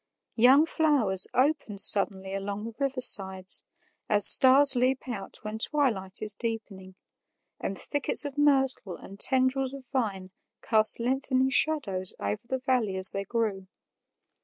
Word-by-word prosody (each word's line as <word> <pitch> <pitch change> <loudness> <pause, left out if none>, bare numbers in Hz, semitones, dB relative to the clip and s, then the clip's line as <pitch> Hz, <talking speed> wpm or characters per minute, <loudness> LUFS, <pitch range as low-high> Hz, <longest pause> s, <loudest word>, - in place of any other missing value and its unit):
Young 260 +7 +4
flowers 275 - +1
opened 255 -6 -2
suddenly 195 -1 +2
along 200 +1 -6
the 230 +1 -8
riversides, 195 -9 +2 0.5
as 205 -2 +3
stars 270 +1 +5
leap 255 +2 -2
out 225 -6 -7
when 215 +1 -7
twilight 220 -10 -2
is 210 -1 -7
deepening, 205 -5 -8 0.6
and 195 - -6
thickets 290 0 0
of 285 -2 -7
myrtle 270 -9 -1
and 195 +1 -15
tendrils 260 0 +1
of 270 -2 -13
vine 195 -7 -4 0.3
cast 220 -1 +3
lengthening 260 +1 -2
shadows 215 -13 -1
over 100 +1 -5
the 260 - -3
valley 250 -6 -2
as 190 0 +8
they 195 0 -6
grew. 205 -4 -4
230 Hz, 135 wpm, -25 LUFS, 195-265 Hz, 0.6 s, as